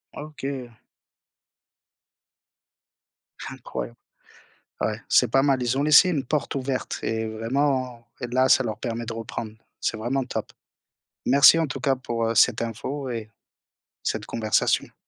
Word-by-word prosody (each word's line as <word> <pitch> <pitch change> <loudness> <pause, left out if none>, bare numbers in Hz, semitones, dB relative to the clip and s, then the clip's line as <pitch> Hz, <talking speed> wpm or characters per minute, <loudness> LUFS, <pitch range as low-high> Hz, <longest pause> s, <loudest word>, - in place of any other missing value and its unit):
OK. 140 -4 -6 2.8
Incroyable. - - -6 0.9
Ouais, - - -1
c'est - - +5
pas 135 - +4
mal, 135 -2 +2
ils 120 +2 0
ont 140 - +1
laissé 155 +4 +7
une 145 -6 0
porte 150 +3 -2
ouverte 135 -1 -3
et 110 0 -2
vraiment 125 +1 -1
là, 125 +2 +2
ça 130 - +5
leur 110 -3 -3
permet 115 0 -4
de 115 - -3
reprendre, 115 -1 -6 0.3
c'est 110 - -1
vraiment 130 +4 -1
top. 125 - -5 0.7
Merci 140 +5 +7
en 165 - +2
tout 135 -1 -5
cas 135 +1 +2
pour 120 -3 -2
heu, 115 - -1
cette 115 +2 +4
info 130 +4 -4
et 110 -2 -5 0.7
cette - - -2
conversation. 110 -2 0
125 Hz, 135 wpm, -25 LUFS, 115-135 Hz, 2.8 s, laissé